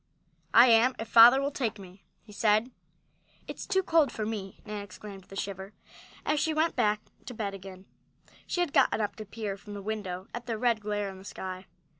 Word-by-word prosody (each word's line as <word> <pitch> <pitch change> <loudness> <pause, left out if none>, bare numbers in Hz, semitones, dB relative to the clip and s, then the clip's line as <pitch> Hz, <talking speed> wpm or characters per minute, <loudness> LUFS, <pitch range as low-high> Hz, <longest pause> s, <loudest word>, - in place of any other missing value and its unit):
"I 235 - +10
am, 240 +1 +5
if 225 - -5
father 235 +4 +8
will 280 +1 -1
take 245 -6 -2
me," 190 0 -14 0.2
he 215 - -16
said. 215 +3 +2 0.8
"It's - - -7
too 380 -1 +1
cold 325 -6 +3
for 215 - -4
me!" 205 -3 -5
Nan 210 -1 -5
exclaimed 200 0 -10
with - - -28
a - - -8
shiver, 195 0 -5 0.5
as 300 0 +1
she 315 +1 0
went 320 +1 +1
back 210 0 +1 0.3
in 245 - -8
bed 205 -3 -3
again. 190 -1 -10 0.6
She 355 - -1
had 345 -5 -1
gotten - - +3
up 210 -2 -2
to 215 - -7
peer 205 -1 -5
from 205 +1 -10
the 200 - -6
window 195 -3 -4
at 240 +1 -7
the 230 -2 -2
red 235 -1 +1
glare 205 -1 -2
in 190 - -12
the - - -13
sky. 185 -1 -7
215 Hz, 210 wpm, -29 LUFS, 195-240 Hz, 0.8 s, I